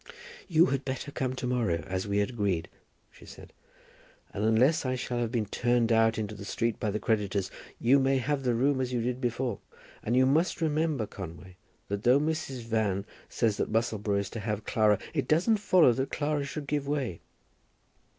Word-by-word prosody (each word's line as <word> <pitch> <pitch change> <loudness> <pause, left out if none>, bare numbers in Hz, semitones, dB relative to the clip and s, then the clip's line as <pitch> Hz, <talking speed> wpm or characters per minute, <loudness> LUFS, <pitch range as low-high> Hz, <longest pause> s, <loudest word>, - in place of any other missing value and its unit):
"You 170 -1 +5
had 135 0 -1
better 135 +2 -4
come 130 -2 -2
to 130 - -4
morrow, 115 -11 0
as 95 +2 -3
we 100 0 0
had 105 +3 +1
agreed," 100 -8 -1 0.4
she - - -17
said; - - -13 0.8
"and 105 - -3
unless 115 +8 +3
I 130 -1 -1
shall 125 -1 -3
have 115 -2 -1
been 115 -4 0
turned 120 +2 +1
out 115 0 +4
into 110 -1 -3
the 100 - -9
street 115 +2 -2
by 110 - -1
the 105 - -1
creditors, 100 -4 -1 0.3
you 130 +4 +4
may 135 0 +2
have 135 +2 -1
the 125 -3 +1
room 135 +2 +2
as 125 -1 -2
you 120 -2 0
did 125 +1 -2
before. 120 -3 -1 0.4
And 120 +3 0
you 130 - +5
must 155 +7 +2
remember, 155 -5 0
Conway, 90 -2 -9 0.3
that 100 0 -3
though 125 +5 +5
Mrs. 150 -4 -2
Van 110 -4 -1 0.2
says 110 -3 0
that - - -2
Musselboro 110 -2 0
is 100 - -3
to 115 - -5
have 105 -1 -3
Clara, 105 -2 +3 0.2
it 145 -4 -1
doesn't 185 +8 +3
follow 185 - +5
that 135 +3 -2
Clara 145 -1 -1
should 145 +1 -5
give 145 -1 -2
way." 135 - -2
120 Hz, 195 wpm, -29 LUFS, 105-135 Hz, 0.8 s, You